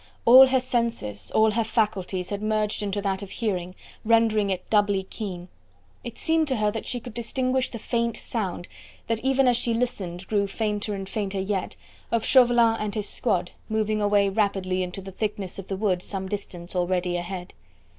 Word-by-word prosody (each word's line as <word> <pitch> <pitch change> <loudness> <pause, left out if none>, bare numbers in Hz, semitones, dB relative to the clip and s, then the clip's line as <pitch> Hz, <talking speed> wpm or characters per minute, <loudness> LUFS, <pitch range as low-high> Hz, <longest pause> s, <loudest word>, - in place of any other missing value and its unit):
All 260 +3 +10
her 260 0 +3
senses, 230 - -2
all 220 0 +4
her 230 +2 +1
faculties 195 -5 -1
had 200 0 -3
merged 215 -1 0
into 205 0 -2
that 195 -1 -1
of 200 - -7
hearing, 185 -6 -3 0.3
rendering 225 -2 +3
it 185 -1 -3
doubly 205 -2 +3
keen. 190 -3 -6 0.6
It - - -7
seemed 320 -1 +2
to 265 - +1
her 210 -2 +1
that 225 - -5
she 245 - -2
could 240 -1 -10
distinguish 255 +2 0
the 235 - -6
faint 235 0 -1
sound 190 -6 -3 0.4
that 230 0 -2
even 270 0 +3
as 245 -1 +4
she 235 -1 0
listened 195 -7 -3
grew 200 -1 +1
fainter 210 0 -2
and 195 -1 -6
fainter 195 -1 -3
yet 190 -1 -2 0.4
of 230 -1 +1
Chauvelin 240 -3 +5
and 210 0 -3
his 210 -2 -2
squad 180 -7 -1 0.2
moving 215 -1 0
away 205 -1 +3
rapidly 195 -2 0
into 180 +1 -4
the 195 0 -9
thickness 200 -2 -3
of 195 - -8
the 195 - -3
wood 190 -3 +1
some 190 0 -4
distance 185 -3 -5
already 180 0 0
ahead. 180 +1 -5
210 Hz, 185 wpm, -25 LUFS, 190-230 Hz, 0.6 s, All